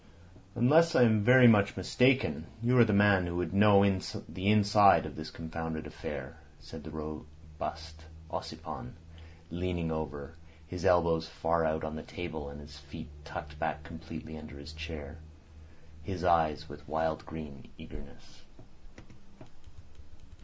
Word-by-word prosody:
"Unless 160 +7 +4
I 125 - +7
am 110 -3 +4
very 125 +2 +8
much 100 -4 +4
mistaken, 125 +8 +2 0.2
you 125 +2 +3
are - - +9
the 110 - +1
man 100 -3 +4
who 85 - -4
would 90 0 -2
know 100 0 +6 0.4
the 95 +2 -2
inside 100 -5 +5
of 75 - -8
this 80 0 -7
confounded 80 -1 -6
affair," 70 +5 -7 0.2
said 80 -2 -11
the 80 - -8
robust 80 +1 -8 0.3
Ossipon, - - -7 0.6
leaning 85 -1 -2
over, 75 -2 -5 0.3
his 90 +3 -6
elbows 85 -3 +3
far 80 0 0
out 80 0 -1
on 75 0 -4
the 80 - -6
table 80 -5 -6
and 70 +1 -10
his 75 0 -12
feet 70 0 -10
tucked 75 -1 -8
back 80 -1 -2
completely 80 0 -9
under 75 -2 -11
his 70 +2 -10
chair. 80 -1 -8 0.8
His 90 +1 -5
eyes 80 -4 +3
stared - - -15
with 75 0 -12
wild 80 0 -1 0.5
eagerness. 75 -3 -13
80 Hz, 140 wpm, -30 LUFS, 75-95 Hz, 0.8 s, are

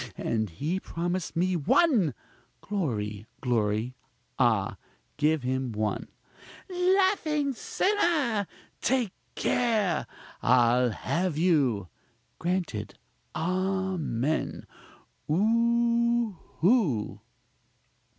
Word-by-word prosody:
and 110 -2 -1
he 150 - -2
promised 175 0 -3
me 180 +2 +1
one! 180 - +3 0.4
(Glory! 110 - -3
glory! 115 -1 0 0.5
ah! 110 -6 +2 0.4
give 150 -1 +2
him 130 0 -1
one!) 105 0 -2 0.6
laughing 360 -6 +2
sinner! 295 - +1 0.3
take 250 -6 +1 0.2
care! 215 -9 +1 0.3
I'll 125 0 +4
have 170 - -1
you! 140 - +2 0.5
(Grant 180 -2 -1
it 105 -1 -6 0.4
amen! 185 -5 -1 0.6
ooohoo!) 230 - +2
175 Hz, 75 wpm, -28 LUFS, -, 0.6 s, I'll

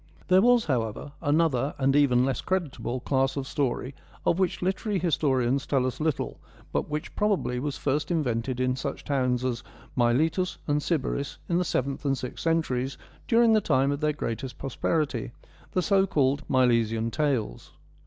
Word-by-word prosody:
There 185 +1 +6
was, 245 +1 +4
however, 125 -1 -2
another 145 -3 +1
and 135 0 +2
even 130 -4 +4
less 135 -3 -1
credit 180 -7 -1
able 120 +2 -3
class 135 0 0
of 135 - -2
story 135 -1 -2 0.3
of 170 - +2
which 185 -1 0
literary 195 +2 0
historians 140 -6 +1
tell 135 -3 +2
us 130 -1 -3
little, 155 -2 -1 0.3
but - - -1
which, 150 0 -4
probably, 200 -12 0
was 140 +1 -3
first 145 +1 -1
invented 130 -7 -1
THE 130 - 0
MILESIAN 130 0 +1
TALES - - -5
45 140 -1 -2
in - - -19
such - - -15
towns 125 -3 0
as 120 -2 -2 0.3
Miletus 155 +10 +1
and 145 -1 +1
Sybaris 140 -3 -2
in 170 0 +1
the - - +2
seventh 140 -4 -2
and 135 -2 +1
sixth 125 0 -6
centuries, 140 -6 0 0.3
during 230 -1 +5
the 215 - +4
time 135 -5 +2
of 140 - -2
their 150 0 +1
greatest 125 -2 -4
prosperity 135 -1 -1 0.2
— - - -26
the 185 - +1
so 195 0 +3
called 140 -3 +2
Milesian 115 -3 +2
Tales. 130 - -1
140 Hz, 185 wpm, -27 LUFS, 125-160 Hz, 0.3 s, There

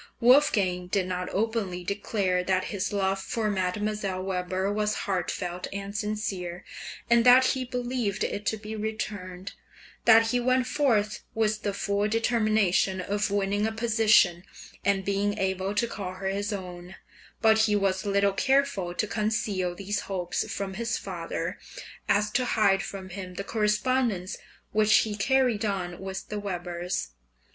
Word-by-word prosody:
Wolfgang 205 -9 +4
did 185 0 0
not 180 0 -3
openly 200 -4 -1
declare 195 -1 0
that 185 0 +1
his 200 -1 -2
love 195 -1 0
for 215 +1 -1
Mdlle. 195 0 -2
Weber 185 +1 -1
was 210 0 0
heartfelt 180 -1 -2
and 200 +1 -6
sincere, 200 -4 -3 0.4
and 235 0 +5
that 250 +1 +7
he 260 -1 -2
believed 245 -4 -2
it 205 - -2
to 220 - +1
be 215 +1 -7
returned, 200 -4 -5 0.5
that 225 0 +7
he 245 - +1
went 255 +1 +2
forth 215 -7 +1
with 215 -1 +1
the 205 - -1
full 200 +1 0
determination 215 -4 +2
of 205 +3 -1
winning 205 +1 +1
a - - -2
position, 215 -6 +3 0.4
and 195 -1 +1
being 200 +1 0
able 190 +1 -1
to 220 - +2
call 195 -5 -5
her 190 +1 -3
his 200 +2 -2
own; 180 -2 -7 0.4
but 220 -1 +5
he 215 -1 +3
was 195 -1 +1
little 200 -1 +2
careful 230 -8 +1
to 215 - 0
conceal 210 -4 -1
these 200 +2 -2
hopes 180 -3 -3
from 195 -1 -3
his 230 +4 -2
father - - -4 0.5
as 210 +1 +2
to 250 +3 +1
hide 200 -5 +3
from 190 -1 -7
him 185 -1 -7
the 200 - -4
correspondence 210 -1 0 0.4
which 215 0 +4
he 215 - -2
carried 235 +1 +2
on 185 -4 -2
with 190 0 -6
the 210 - -3
Webers. 175 - -3
205 Hz, 150 wpm, -27 LUFS, 190-220 Hz, 0.5 s, that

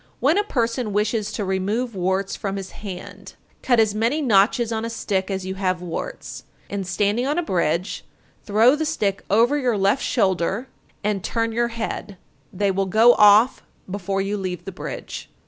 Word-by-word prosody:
When 280 +7 +3
a - - +2
person 235 - -1
wishes 215 0 0
to 205 - -2
remove 205 +6 -1
warts 190 +1 -1
from 195 -1 -4
his 195 -1 -6
hand, 190 -4 -9 0.3
cut 245 -3 +3
as 215 -2 +3
many 230 +8 +1
notches 230 -2 +3
on 220 0 -2
a 230 - -3
stick 200 -4 -2
as 190 -1 -3
you 190 - -3
have 185 -2 -1
warts, 175 -2 -6 0.3
and 195 -2 -3
standing 205 +7 0
on 295 +3 0
a 350 - +1
bridge, 175 - -1 0.4
throw 225 +6 +4
the 310 - -2
stick 210 -11 -1
over 235 +8 +3
your 245 -5 +1
left 200 +6 +2
shoulder, 195 0 0 0.4
and 205 -2 -1
turn 230 0 -1
your 235 +1 +1
head; 225 -4 -5 0.3
they 200 +1 0
will 195 0 -1
go 225 +5 +6
off 210 +5 +6 0.3
before 195 0 -2
you 205 +1 -2
leave 180 -2 -4
the 195 - -5
bridge. 180 - -7
205 Hz, 180 wpm, -22 LUFS, 190-235 Hz, 0.4 s, go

